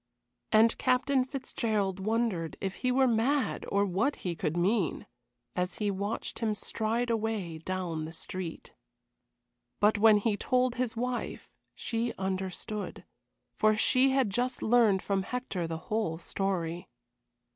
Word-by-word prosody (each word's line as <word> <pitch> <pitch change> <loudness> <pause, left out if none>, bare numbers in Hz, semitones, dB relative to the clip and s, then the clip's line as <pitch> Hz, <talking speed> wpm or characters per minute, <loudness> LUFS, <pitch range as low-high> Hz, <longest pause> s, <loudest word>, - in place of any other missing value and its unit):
And 225 +1 +5
Captain 255 +1 +3
Fitzgerald 220 -7 -2
wondered 205 -6 -1
if 190 -1 -3
he 255 - 0
were 265 +1 +4
mad 250 +2 +1
or 200 0 +3
what 200 +10 +1
he 175 -2 -1
could 160 0 -2
mean, 185 -1 +1 0.5
as 180 +1 -1
he 210 -2 0
watched 200 +3 -3
him 220 -2 0
stride 230 +3 -1
away 215 -7 -2
down 170 -2 -3
the 160 - -7
street. 175 0 -6 1.1
But 210 0 +4
when 215 0 +7
he 205 0 +1
told 255 +1 +2
his 245 -2 -2
wife, 250 +1 -3 0.2
she 230 +1 -2
understood, 190 +2 -4 0.5
for 215 0 +3
she 255 +4 +4
had 265 -6 +2
just 245 +5 -1
learned 220 -5 +4
from 195 -1 0
Hector 195 -5 -3
the 165 0 -3
whole 190 -1 -2
story. 175 -2 -2
215 Hz, 135 wpm, -30 LUFS, 185-240 Hz, 1.1 s, when